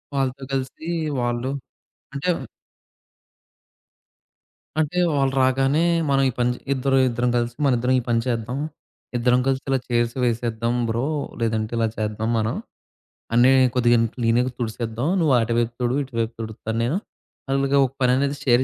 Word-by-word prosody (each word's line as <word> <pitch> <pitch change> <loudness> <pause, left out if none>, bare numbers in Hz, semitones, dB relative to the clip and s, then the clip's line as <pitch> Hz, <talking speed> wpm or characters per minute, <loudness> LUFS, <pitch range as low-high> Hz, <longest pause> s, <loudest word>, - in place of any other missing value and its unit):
వాళ్ళతో 135 0 -1
కలిసి 135 +5 -3 0.3
వాళ్ళు 120 +2 -1 0.6
అంటే 140 +6 -2 2.5
అంటే 160 +3 -1 0.2
వాళ్ళు 135 -1 +1
రాగానే 135 +4 +2 0.3
మనం 135 0 +3
ఈ - - +1
పని 120 0 +2 0.2
ఇద్దరు 135 0 +1
ఇద్దరం 120 0 0
కలిసి 120 0 -1
మనిద్దరం 125 -1 +2
ఈ - - +2
పని 115 -1 +2
చేద్దాం. 120 +1 -2 0.6
ఇద్దరం 125 +1 +3
కలిసి 135 0 +1
ఇలా 135 - +3
చైర్స్ 120 -1 +1
వేసేద్దాం 115 0 0
బ్రో. 115 +3 0 0.4
లేదంటే 110 -1 -1
ఇలా 115 - +2
చేద్దాం 110 +1 -2
మనం. 110 +1 -1 0.8
అన్నీ 120 +3 +6 0.2
కొద్దిగా 120 -1 +4 0.2
క్లీనింగ్ 120 +1 +1
తుడిసేద్దాం. 115 +2 -3
నువ్వు 155 -5 +3
అటువైపు 115 +1 0
తుడు 120 +2 +1
ఇటువైపు 115 -3 -3
తుడుత్తాన్నేను. 115 - -2 0.5
అలాగా 135 +1 +2
ఒక 125 - -4
పననేది 135 +3 +2
షేర్ 125 -1 +4
125 Hz, 130 wpm, -23 LUFS, 115-135 Hz, 2.5 s, అన్నీ